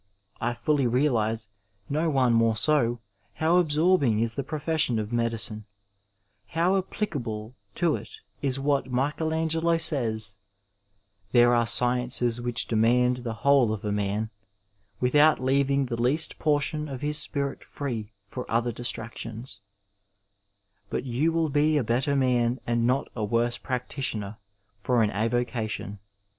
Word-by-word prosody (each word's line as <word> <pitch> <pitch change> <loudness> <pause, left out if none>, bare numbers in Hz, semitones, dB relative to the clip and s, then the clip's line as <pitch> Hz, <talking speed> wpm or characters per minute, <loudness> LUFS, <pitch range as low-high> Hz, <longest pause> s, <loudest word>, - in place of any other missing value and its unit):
I 120 - -1
fully 140 +1 +1
realize, 115 -4 0 0.4
no 155 +3 0
one 130 -5 +2
more 115 -1 +3
so, 120 -2 +1 0.3
how 165 +3 +2
absorbing 155 -7 +2
is 115 0 0
the 140 - -2
profession 155 -2 +1
of 110 +1 -4
medicine; 115 -2 -1 0.8
how 170 - +1
applicable 125 - -3 0.2
to 170 -3 +1
it - - -11 0.3
is 135 -1 -1
what 140 -1 0
Michelangelo 160 +5 0
sajns: 110 - +2 0.5
" 100 0 -43
There 120 0 +6
are 120 -1 +2
sciences 120 0 +1
which 120 -2 +1
demand 125 +3 +2
the 120 -2 -5
whole 140 -5 +5
of 110 0 -5
a 105 - -1
man, 105 +2 -2 0.7
without 145 +5 +4
leaving 140 +1 +1
the 120 -2 -4
least 150 +6 0
portion 150 0 0
of 130 -2 -6
his 150 +1 +5
spirit 140 -2 -1
free 115 -7 -5
for 125 +5 -7
other 120 +1 +1
distractions 115 -1 -5 0.6
"; 100 0 -46
but - - -2
you 135 +6 0
will 165 -1 0
be 150 +2 +2
a 140 - +1
better 130 +6 0
man 125 -2 +1
and 120 0 +1
not 130 +2 +1
a 110 - -3
worse 115 +3 0
practitioner 125 -5 -3 0.4
for 120 +2 +2
an 105 - 0
avocation. 110 -2 -2
125 Hz, 140 wpm, -26 LUFS, 110-145 Hz, 0.8 s, There